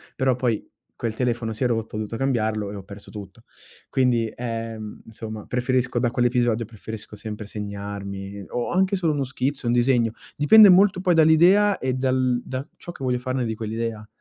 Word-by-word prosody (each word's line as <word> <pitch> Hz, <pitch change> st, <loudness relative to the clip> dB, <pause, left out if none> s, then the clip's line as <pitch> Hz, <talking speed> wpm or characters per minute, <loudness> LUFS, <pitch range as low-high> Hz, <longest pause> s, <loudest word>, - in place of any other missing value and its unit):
però 130 Hz, -2 st, +2 dB
poi 120 Hz, -4 st, -1 dB, 0.3 s
quel 115 Hz, -2 st, -3 dB
telefono 120 Hz, -2 st, -1 dB
si 110 Hz, -, -3 dB
è -, -, +4 dB
rotto, 115 Hz, -2 st, -2 dB
ho -, -, -2 dB
dovuto 110 Hz, +1 st, -4 dB
cambiarlo 110 Hz, -6 st, -1 dB
e -, -, -7 dB
ho 100 Hz, -, -7 dB
perso 100 Hz, +1 st, -12 dB
tutto. 105 Hz, +1 st, -10 dB, 0.5 s
Quindi, 120 Hz, -4 st, +1 dB
ehm, 115 Hz, -2 st, -5 dB
insomma 110 Hz, -1 st, -8 dB
preferisco 125 Hz, 0 st, 0 dB
da 120 Hz, -1 st, +1 dB
quell'episodio 120 Hz, -2 st, +1 dB
preferisco 110 Hz, 0 st, -9 dB
sempre 105 Hz, 0 st, -7 dB
segnarmi 100 Hz, -1 st, -6 dB
o 120 Hz, -1 st, -2 dB
anche 190 Hz, +2 st, +2 dB
solo 165 Hz, -5 st, +1 dB
uno 140 Hz, -, -1 dB
schizzo, 130 Hz, 0 st, -3 dB
un 120 Hz, -, +2 dB
disegno, 120 Hz, -2 st, +3 dB, 0.2 s
dipende 210 Hz, +8 st, +8 dB
molto 190 Hz, 0 st, +5 dB
poi 180 Hz, -2 st, +3 dB
dall'idea 175 Hz, +6 st, +5 dB
e 130 Hz, -1 st, -1 dB
dal 130 Hz, -1 st, +1 dB
da 130 Hz, +3 st, -5 dB
ciò 175 Hz, -, -8 dB
che 155 Hz, -, -10 dB
voglio 125 Hz, -1 st, 0 dB
farne 130 Hz, 0 st, -2 dB
di 110 Hz, -, -2 dB
quell'idea. 110 Hz, 0 st, -4 dB
120 Hz, 180 wpm, -24 LUFS, 110-130 Hz, 0.5 s, dipende